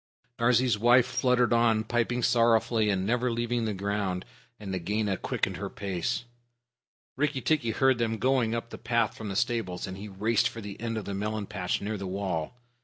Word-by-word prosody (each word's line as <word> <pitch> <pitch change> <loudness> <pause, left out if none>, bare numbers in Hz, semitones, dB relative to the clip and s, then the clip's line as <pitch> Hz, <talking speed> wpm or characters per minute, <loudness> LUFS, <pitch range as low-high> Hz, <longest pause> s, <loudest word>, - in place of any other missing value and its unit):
Darzee's 120 -2 +3
wife 120 +2 +6
fluttered 125 -1 +2
on, 115 -2 +3
piping 120 +2 0
sorrowfully, 115 -2 +3
and 95 -2 0
never 120 +3 +1
leaving 120 0 -1
the 110 - -1
ground, 100 -2 -2 0.3
and 100 -3 -6
Nagaina 100 +3 -1
quickened - - -2
her - - -4
pace. 95 +1 -2 0.9
Rikki 145 -1 0
tikki 145 -2 +1
heard 130 +2 +3
them 115 -1 0
going 125 -2 +2
up 115 0 -5
the - - -8
path 115 -2 0
from 110 -2 -6
the 95 - -4
stables, 95 -6 -1
and 95 0 -7
he 105 - -7
raced 110 +4 +1
for 115 - -9
the 100 -1 -8
end 115 -1 -2
of 110 - -4
the 100 - -4
melon 105 +1 -2
patch 95 -4 -2
near 105 +1 -2
the 95 - -4
wall. 95 0 -3
110 Hz, 185 wpm, -28 LUFS, 100-120 Hz, 0.9 s, wife